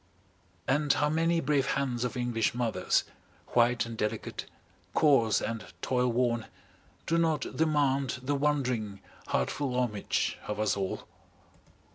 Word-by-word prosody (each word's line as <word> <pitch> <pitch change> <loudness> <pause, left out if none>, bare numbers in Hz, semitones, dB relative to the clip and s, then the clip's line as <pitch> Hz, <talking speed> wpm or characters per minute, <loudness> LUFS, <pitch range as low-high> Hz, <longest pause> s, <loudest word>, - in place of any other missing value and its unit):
And 145 +2 +2
how 150 - +1
many 165 +1 +2
brave 140 -3 +1
hands 130 -3 -1
of 125 +1 -2
English 120 -2 0
mothers, 115 -7 +1 0.5
white 120 0 +3
and 115 0 -6
delicate, 105 -1 -3 0.5
coarse 135 -8 +4
and 115 -2 -3 0.2
toil 125 -1 +2
worn, 120 -1 +1 0.6
do 165 0 +2
not 160 -4 0
demand 140 -4 +1
the 140 +3 0
wondering, 125 -8 0 0.3
heart - - 0
full 135 -4 -2
homage 105 -5 -1
of 105 0 -3
us 110 -1 +2
all? 95 -2 -3
125 Hz, 130 wpm, -30 LUFS, 115-145 Hz, 0.6 s, coarse